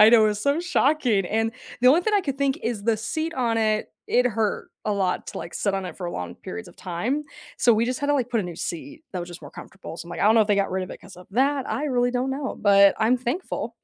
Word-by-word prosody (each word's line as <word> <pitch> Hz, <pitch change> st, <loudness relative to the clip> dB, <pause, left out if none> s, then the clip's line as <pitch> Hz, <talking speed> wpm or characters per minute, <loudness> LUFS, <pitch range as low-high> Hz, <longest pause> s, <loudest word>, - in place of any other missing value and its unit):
I 215 Hz, -, +10 dB
know, 225 Hz, -2 st, +7 dB
it -, -, +4 dB
was 210 Hz, 0 st, -2 dB
so 285 Hz, +4 st, +2 dB
shocking. 275 Hz, -, +2 dB
And 225 Hz, +2 st, 0 dB, 0.3 s
the 250 Hz, -, +6 dB
only 310 Hz, +6 st, +6 dB
thing 425 Hz, +4 st, -1 dB
I 405 Hz, -, +4 dB
could 275 Hz, -6 st, -3 dB
think 275 Hz, -1 st, +1 dB
is 230 Hz, -4 st, -2 dB
the 225 Hz, 0 st, +2 dB
seat 315 Hz, +10 st, -3 dB
on 235 Hz, -3 st, 0 dB
it, 215 Hz, -1 st, +1 dB, 0.2 s
it 250 Hz, +1 st, +3 dB
hurt 220 Hz, -2 st, -1 dB
a 210 Hz, -, 0 dB
lot 190 Hz, -2 st, 0 dB
to, -, -, -6 dB
like, 170 Hz, -, -7 dB
sit 200 Hz, -2 st, 0 dB
on 195 Hz, -, -2 dB
it -, -, -8 dB
for 175 Hz, -2 st, -4 dB
long 90 Hz, -, -5 dB
periods 90 Hz, 0 st, -8 dB
of -, -, -17 dB
time. 225 Hz, -, -2 dB, 0.3 s
So, 240 Hz, -, +5 dB
we 225 Hz, +2 st, +2 dB
just 255 Hz, +3 st, -2 dB
had 285 Hz, -, -1 dB
to, 290 Hz, -, +4 dB
like, 250 Hz, -3 st, 0 dB
put 230 Hz, -, +1 dB
a -, -, -2 dB
new 175 Hz, -2 st, -6 dB
seat 290 Hz, -, -6 dB
that 185 Hz, -, -3 dB
was 175 Hz, -, -6 dB
just 175 Hz, -, -9 dB
more -, -, -10 dB
comfortable, 185 Hz, -4 st, -10 dB
so, 170 Hz, -, -7 dB
I'm -, -, -10 dB
like, -, -, -5 dB
I -, -, +2 dB
don't 215 Hz, -, +6 dB
know 225 Hz, -, +6 dB
if -, -, -2 dB
they 205 Hz, -, +3 dB
got 200 Hz, -2 st, +1 dB
rid 190 Hz, 0 st, -1 dB
of 185 Hz, -, -11 dB
it -, -, -9 dB
'cause 195 Hz, -2 st, -14 dB
of 180 Hz, -, -13 dB
that, 270 Hz, +4 st, +1 dB
I 295 Hz, -, -1 dB
really 245 Hz, -4 st, +1 dB
don't 255 Hz, +2 st, -1 dB
know. 270 Hz, 0 st, -3 dB
But 200 Hz, -1 st, +6 dB
I'm 225 Hz, +3 st, +3 dB
thankful 255 Hz, +9 st, -3 dB
225 Hz, 300 wpm, -24 LUFS, 200-265 Hz, 0.3 s, I